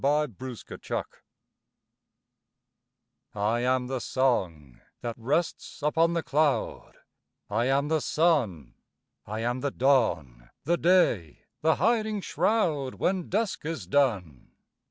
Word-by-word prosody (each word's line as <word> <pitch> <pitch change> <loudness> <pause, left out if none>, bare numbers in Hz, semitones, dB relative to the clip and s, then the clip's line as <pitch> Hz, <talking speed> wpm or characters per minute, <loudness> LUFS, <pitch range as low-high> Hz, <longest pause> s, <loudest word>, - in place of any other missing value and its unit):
I 145 +2 +3
AM 130 -9 -7
THE 130 -3 -8
WORLD - - -1 2.3
I 105 +3 +1
am 125 +1 +1
the 130 0 -3
song, 90 - -1 0.2
that 120 -1 -3
rests 145 +5 -2
upon 165 +3 +2
the 170 -1 -1
cloud; 150 0 0 0.6
I 115 +3 +1
am 135 +2 +2
the 155 0 +1
sun: 130 - +1 0.5
I 110 +2 -4
am 120 +2 -1
the 140 +2 -1
dawn, 110 - +1
the 170 +5 +1
day, 165 - +2 0.2
the 160 +1 +3
hiding 215 0 +1
shroud, 165 - 0
When 185 -2 -1
dusk 215 +2 -1
is 155 - -4
done. 95 - 0
135 Hz, 120 wpm, -27 LUFS, 115-160 Hz, 2.3 s, I